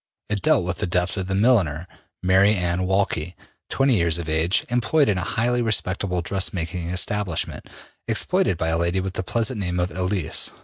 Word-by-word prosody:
'' - - -50
It 105 -2 -1
dealt 90 - +3
with 90 -1 -3
the - - -1
death 90 +1 0
of 95 -3 -3
the 95 - -1
milliner, 95 - +2 0.4
Mary 95 +3 +4
Anne 90 0 0
Walkley, 90 -3 -1 0.3
20 135 -2 +2
years 85 -4 +2
of 85 -2 -6
age, 80 +3 +1
employed 125 +5 +2
in 100 -3 +1
a - - -1
highly 120 +2 +2
respectable 95 -4 0
dressmaking 90 -2 -2
establishment, 90 0 -2 0.4
exploited 95 - +1
by 80 0 0
a 80 0 +1
lady 85 +2 +1
with 95 0 -4
the - - -2
pleasant 115 +4 0
name 90 -2 -2
of 90 +1 -1
Elise. 90 -3 -2
95 Hz, 185 wpm, -23 LUFS, 85-105 Hz, 0.4 s, Mary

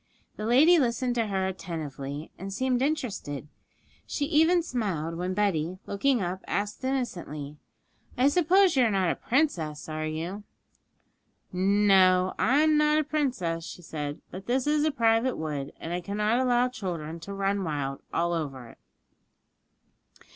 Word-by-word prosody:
The 215 - -4
lady 310 +9 +6
listened 245 -1 0
to 230 -2 0
her 190 -2 -1
attentively, 155 -6 -5
and 195 +2 -7
seemed 255 +4 0
interested; 225 - -2 0.6
she 290 - -1
even 325 +3 +4
smiled 190 - -2
when 180 +2 -3
Betty, 185 -4 0
looking 240 +2 +1
up, 180 +1 -3
asked 205 +4 -2
innocently, 170 - -3 0.6
'I 260 +3 +5
suppose 360 +3 +4
you 260 - +5
are - - +3
not 190 -4 +1
a - - -2
princess, 185 - -1
are 155 0 -3
you?' 170 +6 -4 1.1
'No, 185 -1 +4
I'm 300 +5 +4
not 300 0 +4
a 310 - +3
princess,' 250 - -1
she 175 - -9
said; 150 -2 -5
'but 190 +2 -9
this 250 +1 +1
is 300 0 +2
a 310 - +2
private 230 -1 +2
wood, 145 -3 -4
and 165 - -5
I 175 - -2
cannot 210 +5 0
allow 250 -1 +3
children 170 -9 -5
to 200 +5 -8
run 195 0 0
wild 140 -4 -3
all 170 +1 0
over 135 -7 -4
it.' - - -17
200 Hz, 150 wpm, -27 LUFS, 165-260 Hz, 1.1 s, lady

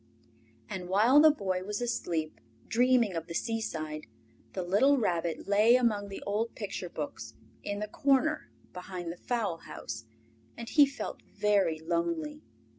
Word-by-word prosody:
And 180 +4 -6
while 225 +9 +6
the 315 - +9
Boy 190 -10 -1
was 205 +1 -3
asleep, 170 -10 -2 0.3
dreaming 245 -3 +3
of 165 -1 -4
the 170 - -6
seaside, 160 - -3 0.5
the 185 - -2
little 215 +11 +4
Rabbit 170 -8 -1
lay 210 +4 +5
among 215 -5 +1
the 195 - -7
old 215 +3 -1
picture 195 -4 -5
books 120 -8 -6 0.3
in 205 - -3
the 210 - -2
corner 280 +5 +1 0.2
behind 180 -1 -6
the 175 - -9
fowl 220 -8 -1
house, 115 -7 -7 0.5
and 235 - -7
he 290 -2 +6
felt 275 - -6
very 200 -6 +1
lonely. 305 - -2
205 Hz, 145 wpm, -30 LUFS, 175-245 Hz, 0.5 s, the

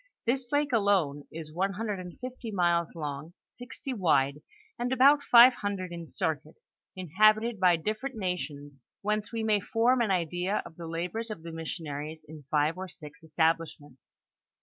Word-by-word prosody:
This 250 +1 0
lake 290 -2 +1
alone 190 -10 +2
is 155 -1 -8
one 195 +4 0
hundred 210 -1 -3
and 180 -1 -9
fifty 250 -2 -7
miles 175 -4 +1
long, 150 +1 -5 0.2
sixty 260 +2 -6
wide, 150 - +2 0.4
and 245 +1 -1
about 275 +3 +6
five 245 -1 +8
hundred 200 -5 -4
in 170 -1 -7
circuit, 155 -1 -3 0.4
inhabited 215 +5 +3
by 180 -2 +5
different 215 +10 -3
nations, 145 - -4 0.2
whence 210 0 -1
we 225 -1 -3
may 215 -1 +3
form 240 +5 +2
an 225 - +1
idea 180 +2 0
of 165 - -11
the 170 0 -8
la 165 +2 -2
bors 225 +5 -5
of 210 -7 -7
the 165 - -7
missionaries 155 -1 -6
in 150 -2 -11
five 155 +3 +1
or 190 - -5
six 155 -3 -12
establishments. 160 -4 -2
180 Hz, 165 wpm, -29 LUFS, 160-220 Hz, 0.4 s, five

